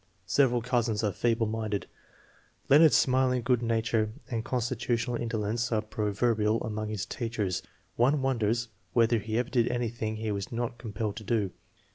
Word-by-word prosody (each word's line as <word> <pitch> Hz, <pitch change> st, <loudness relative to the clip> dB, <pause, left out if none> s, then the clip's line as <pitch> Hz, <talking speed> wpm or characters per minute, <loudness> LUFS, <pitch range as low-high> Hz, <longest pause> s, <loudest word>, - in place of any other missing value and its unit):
Several 125 Hz, +1 st, +3 dB
cousins 120 Hz, -3 st, 0 dB
are 105 Hz, -, +2 dB
feeble 115 Hz, +2 st, +1 dB
minded. 110 Hz, -2 st, -2 dB, 0.8 s
Leonard's 150 Hz, +2 st, +7 dB
smiling 130 Hz, -1 st, +3 dB
good 125 Hz, 0 st, +2 dB
nature 115 Hz, -1 st, 0 dB, 0.2 s
and 115 Hz, -2 st, -1 dB
constitutional 120 Hz, 0 st, -1 dB
indolence 115 Hz, 0 st, -1 dB
are 110 Hz, -1 st, +1 dB
proverbial 110 Hz, +1 st, +1 dB
among 110 Hz, -1 st, -3 dB
his 105 Hz, -3 st, -3 dB
teachers. 115 Hz, -6 st, -2 dB, 0.4 s
One 135 Hz, +4 st, +3 dB
wonders 120 Hz, -2 st, 0 dB, 0.2 s
whether 115 Hz, 0 st, +4 dB
he 110 Hz, +2 st, -3 dB
ever 125 Hz, 0 st, -1 dB
did 120 Hz, -2 st, +3 dB
anything 115 Hz, -2 st, -2 dB
he 110 Hz, 0 st, -3 dB
was 100 Hz, -2 st, -4 dB
not 120 Hz, 0 st, -3 dB
compelled 110 Hz, -2 st, -4 dB
to 110 Hz, -, -6 dB
do. 105 Hz, -3 st, 0 dB
115 Hz, 150 wpm, -29 LUFS, 110-120 Hz, 0.8 s, Leonard's